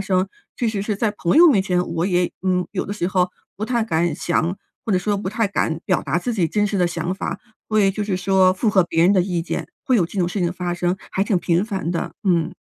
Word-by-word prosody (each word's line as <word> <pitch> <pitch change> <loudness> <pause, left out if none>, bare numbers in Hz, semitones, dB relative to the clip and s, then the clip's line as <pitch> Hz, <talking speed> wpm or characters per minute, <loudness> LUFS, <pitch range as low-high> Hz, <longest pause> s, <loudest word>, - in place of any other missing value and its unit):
生。 190 -1 +1 0.3
确 240 - -1
实 210 -3 -2
是 210 0 -2
在 215 +1 +1
朋 175 - +1
友 345 - +9
面 200 -9 +4
前， 180 -2 0
我 170 +3 0
也 180 -2 +1
嗯， 180 -1 +1
有 195 - -2
的 200 - -4
时 175 -4 -1
候 185 -1 +1 0.3
不 210 - -3
太 235 -2 +1
敢 170 -4 +1
想， 175 +2 0 0.3
或 210 - +1
者 185 - +3
说 205 +3 0
不 195 - -3
太 220 0 +1
敢 165 -5 -1
表 185 - +1
达 175 - 0
自 245 +6 -2
己 175 -6 +1
真 210 -1 +1
实 205 - -2
的 180 - +3
想 170 +1 -3
法， - - -4 0.3
所 215 - +1
以 195 - +4
就 210 - -3
是 200 -3 -1
说 185 0 +3
会 - - -20
符 220 - +2
合 195 -3 +5
别 165 -1 +1
人 185 +4 +5
的 190 - +4
意 175 -2 -1
见， - - -4 0.2
会 255 - +3
有 180 - +3
这 195 - -7
种 175 - +2
事 190 - -4
情 175 - +2
的 - - -4
发 180 -1 -3
生， 175 +1 0 0.2
还 190 - +1
挺 200 -2 +1
频 175 +1 +1
繁 190 -6 -3
的， 170 - -3
嗯。 175 -2 +2
185 Hz, 300 characters per minute, -21 LUFS, 175-205 Hz, 0.3 s, 友